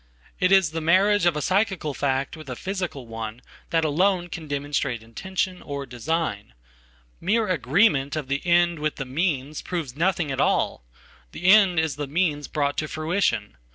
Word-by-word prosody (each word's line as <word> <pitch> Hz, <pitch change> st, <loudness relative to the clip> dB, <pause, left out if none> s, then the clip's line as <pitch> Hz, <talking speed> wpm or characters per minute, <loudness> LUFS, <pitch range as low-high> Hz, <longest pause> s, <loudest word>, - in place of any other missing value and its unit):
It 180 Hz, -1 st, +3 dB
is 190 Hz, -5 st, +5 dB
the 165 Hz, 0 st, -3 dB
marriage 190 Hz, +4 st, +4 dB
of 170 Hz, -, +2 dB
a 150 Hz, -, -2 dB
psychical 190 Hz, -6 st, 0 dB
fact 135 Hz, -1 st, -1 dB
with 155 Hz, -3 st, -11 dB
a 125 Hz, -, -4 dB
physical 180 Hz, -6 st, -4 dB
one 115 Hz, +1 st, -7 dB, 0.3 s
thatalone 175 Hz, +3 st, +1 dB
can 160 Hz, -2 st, -6 dB
demonstrate 140 Hz, -5 st, -2 dB
intention, 185 Hz, -, -3 dB
or 140 Hz, -1 st, -5 dB
design. 125 Hz, -, -3 dB, 0.6 s
Mere 215 Hz, +5 st, +1 dB
agreement 150 Hz, -, +2 dB
of 150 Hz, -3 st, -3 dB
the"end" 170 Hz, +4 st, +2 dB
with 150 Hz, 0 st, -1 dB
the 135 Hz, -, -4 dB
"means" 145 Hz, 0 st, -1 dB
proves 160 Hz, -8 st, -4 dB
nothing 170 Hz, -2 st, 0 dB
at 135 Hz, -, -1 dB
all. -, -, +1 dB, 0.5 s
The -, -, -8 dB
end 190 Hz, -3 st, +6 dB
is 160 Hz, -4 st, -1 dB
the 145 Hz, -1 st, -3 dB
meansbrought 145 Hz, -2 st, 0 dB
to 155 Hz, -, -1 dB
fruition. 155 Hz, -, -1 dB
155 Hz, 155 wpm, -24 LUFS, 140-180 Hz, 0.6 s, end